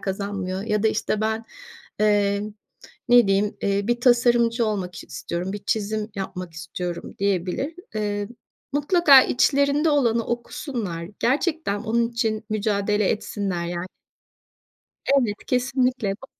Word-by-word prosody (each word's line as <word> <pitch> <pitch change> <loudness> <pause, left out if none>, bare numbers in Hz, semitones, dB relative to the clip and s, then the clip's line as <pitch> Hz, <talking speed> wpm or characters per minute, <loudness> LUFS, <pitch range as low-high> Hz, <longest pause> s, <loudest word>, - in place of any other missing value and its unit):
kazanmıyor." 195 -1 -3
ya 210 -1 0
da, 220 - +4
işte, 215 0 -1
ben, 220 +1 -1 0.6
eee, 205 -1 +3 0.7
ne 245 -2 +7
diyeyim, 200 +1 +1
eee, 200 +1 0
"Bir 240 0 +1
tasarımcı 240 -1 +3
olmak 190 -4 -3
istiyorum, 175 +2 -4
bir 205 0 -6
çizim 215 0 -1
yapmak 185 -3 -5
istiyorum." 175 +1 -6
diyebilir. 200 - -1 0.2
Eee, 205 -1 -2 0.4
mutlaka 290 -2 +6
içlerinde 280 +4 +2
olanı 235 -6 +2
okusunlar. 230 - -4
Gerçekten 285 - 0
onun 230 +1 +1
için 225 -2 -1
mücadele 205 -1 +1
etsinler, 195 -5 -2
yan 175 +1 -4 1.2
Evet, 245 -7 +2
kesinlikle. 250 -4 +1
Ba - - -9
215 Hz, 115 wpm, -23 LUFS, 200-240 Hz, 1.2 s, ne